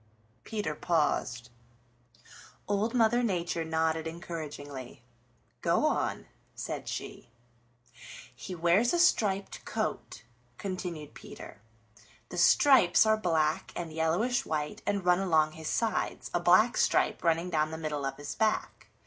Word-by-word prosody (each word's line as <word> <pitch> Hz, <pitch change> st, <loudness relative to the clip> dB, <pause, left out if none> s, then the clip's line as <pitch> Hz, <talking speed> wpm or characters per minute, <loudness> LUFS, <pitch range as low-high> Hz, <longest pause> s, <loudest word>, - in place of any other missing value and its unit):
Peter 210 Hz, -8 st, -3 dB
paused. 145 Hz, -7 st, -1 dB, 1.2 s
Old 205 Hz, +4 st, 0 dB
Mother 240 Hz, +1 st, +3 dB
Nature 175 Hz, -6 st, -1 dB
nodded 160 Hz, 0 st, 0 dB
encouragingly. 145 Hz, -7 st, -7 dB, 0.6 s
"Go -, -, +2 dB
on," -, -, -1 dB, 0.3 s
said -, -, -5 dB
she. -, -, -6 dB, 1.1 s
"He 180 Hz, +8 st, -7 dB
wears 175 Hz, -, +3 dB
a -, -, +2 dB
striped 205 Hz, -, +1 dB
coat," -, -, -4 dB, 0.3 s
continued 180 Hz, -6 st, -5 dB
Peter. -, -, -11 dB, 0.7 s
"The 175 Hz, -, -4 dB
stripes 225 Hz, -1 st, +6 dB
are 220 Hz, 0 st, +4 dB
black 160 Hz, -7 st, 0 dB
and 165 Hz, -2 st, -5 dB
yellowish 170 Hz, +10 st, +1 dB
white 155 Hz, +7 st, -3 dB
and 200 Hz, -3 st, -1 dB
run 180 Hz, 0 st, +4 dB
along 160 Hz, -5 st, +2 dB
his 160 Hz, 0 st, -8 dB
sides, 225 Hz, -1 st, -1 dB
a -, -, +2 dB
black -, -, +4 dB
stripe -, -, +2 dB
running 170 Hz, +1 st, +1 dB
down 155 Hz, -1 st, +1 dB
the 160 Hz, -, -6 dB
middle 150 Hz, -3 st, -3 dB
of 135 Hz, -, -3 dB
his 145 Hz, -, -6 dB
back. 220 Hz, -1 st, -1 dB
170 Hz, 125 wpm, -29 LUFS, 155-205 Hz, 1.2 s, stripes